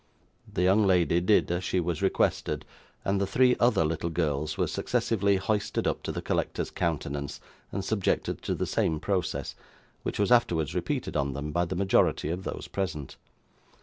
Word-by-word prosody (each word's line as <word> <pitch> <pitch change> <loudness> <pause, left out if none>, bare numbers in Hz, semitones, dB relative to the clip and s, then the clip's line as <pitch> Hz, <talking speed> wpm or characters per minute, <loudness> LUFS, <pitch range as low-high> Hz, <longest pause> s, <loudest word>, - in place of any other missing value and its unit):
The 90 - 0
young 100 +3 +4
lady 90 -2 +3
did 90 0 +3
as 85 +1 -1
she 95 - 0
was 85 -1 -2
requested, 95 - +1 0.4
and 100 0 +1
the 100 - +1
three 125 +4 +4
other 120 -9 +4
little 80 +2 -1
girls 80 -2 -1
were - - +2
successively 100 -3 +1
hoisted 100 +2 -1
up - - 0
to - - -3
the - - -5
collector's - - -1
countenance, 70 -4 -2 0.3
and 95 - -3
subjected 105 -4 0
to - - -2
the - - -1
same 80 -2 0
process, 95 -1 -2 0.5
which - - -3
was 100 +3 +1
afterwards 85 - +3
repeated - - -2
on 70 -2 0
them 70 +2 -4
by 85 +3 +1
the 90 +2 -4
majority 95 -5 +2
of 90 +3 -3
those - - -5
present. 80 -8 -4
90 Hz, 175 wpm, -28 LUFS, 80-100 Hz, 0.5 s, young